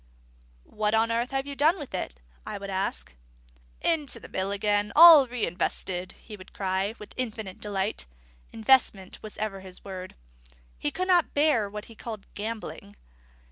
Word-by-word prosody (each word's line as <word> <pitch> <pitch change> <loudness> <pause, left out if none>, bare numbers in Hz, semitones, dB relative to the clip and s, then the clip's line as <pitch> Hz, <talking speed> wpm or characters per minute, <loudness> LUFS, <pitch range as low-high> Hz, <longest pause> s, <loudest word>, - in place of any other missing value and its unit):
"What 210 - -1
on 225 +1 +2
earth 235 +2 0
have 270 0 -2
you 280 0 -6
done 310 +6 +4
with 290 - -9
it?" 180 - -3 0.3
I - - -5
would 200 0 -6
ask. 190 - -2 0.7
"Into 295 -7 0
the - - -11
mill 190 +1 -2
again; 205 0 0
all 320 -4 +10
re 245 -2 -1
invested!" 180 +1 -2
he 215 - -11
would 185 -2 -14
cry, 190 +2 -1
with 210 - -11
infinite 220 -6 -4
delight. 200 - -2 0.4
Investment 220 -5 +2
was 215 - -9
ever 210 -2 -3
his 185 -1 -11
word. 185 -1 -7 0.6
He - - 0
could 370 - -3
not 355 -3 +3
bear 285 -8 +3
what 210 +1 -7
he 230 - -13
called 220 -2 -8
gambling. 215 - -6
215 Hz, 165 wpm, -27 LUFS, 195-250 Hz, 0.7 s, all